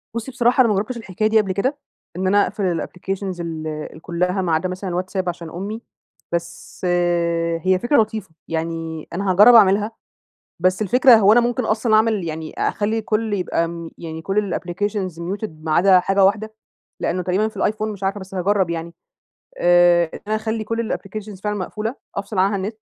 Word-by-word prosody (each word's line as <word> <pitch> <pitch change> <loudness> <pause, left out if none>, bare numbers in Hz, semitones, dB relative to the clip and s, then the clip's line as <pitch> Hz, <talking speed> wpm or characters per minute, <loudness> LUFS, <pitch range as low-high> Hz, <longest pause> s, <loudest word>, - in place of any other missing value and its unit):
بصي 235 +3 -4
بصراحة 250 0 +3
أنا 240 - +4
ما 210 - +2
جربتش 215 +6 -2
الحكاية 215 -1 -2
دي 220 0 +4
قبل 195 -2 -3
كده، 255 +10 -1 0.4
إن 185 +1 -1
أنا 205 +2 +4
أقفل 180 -5 -1
الapplications 190 0 -5
ال 160 -2 -5
ال 155 0 -6
كلها 180 +2 -1
ما 175 -3 0
عدا 160 +3 0
مثلًا 185 +1 -5
الواتساب 185 +1 -2
عشان 170 -1 -6
أمي، 200 +7 -5 0.5
بس 170 +2 -5 0.8
هي 185 +2 +2
فكرة 265 +5 +3
لطيفة، 215 -3 -4 0.2
يعني 165 -1 -4
أنا 195 +2 0
هاجرب 210 +7 +7
أعملها. 205 0 +5 0.7
بس 185 +3 +2
الفكرة 250 +4 +6
هو 210 -1 +5
أنا 240 - +6
ممكن 240 +1 0
أصلًا 220 +1 +1
أعمل 215 -3 +2
يعني 160 -1 -5
أخلي 220 +2 0
كل 215 0 -1
يبقى، 170 -3 -2
يعني 160 -1 -7
كل 195 +1 -1
الapplications 190 +1 -2
muted 195 +6 -4
ما 155 0 -5
عدا 185 +3 +5
حاجة 195 +2 +2
واحدة؟ 215 +3 +1 0.5
لأنه 180 - -1
تقريبًا 185 +5 +1
في 220 - -15
الأيفون، 215 0 -1
مش 200 -1 -11
عارفة؟ 195 +1 -1
بس 190 0 -10
هاجرب 190 -1 +1
يعني. 170 0 -5 0.6
آآ، 175 0 +5
إن - - -7
أنا 215 - +1
أخلي 220 0 -2
كل 230 +1 -2
applications 200 -1 -7
فعلًا 210 0 -1
مقفولة، 215 +5 -4 0.2
أفصل 200 +1 -4
عنها 195 +2 +3
النت. 200 +3 -4
195 Hz, 180 wpm, -21 LUFS, 175-215 Hz, 0.8 s, هاجرب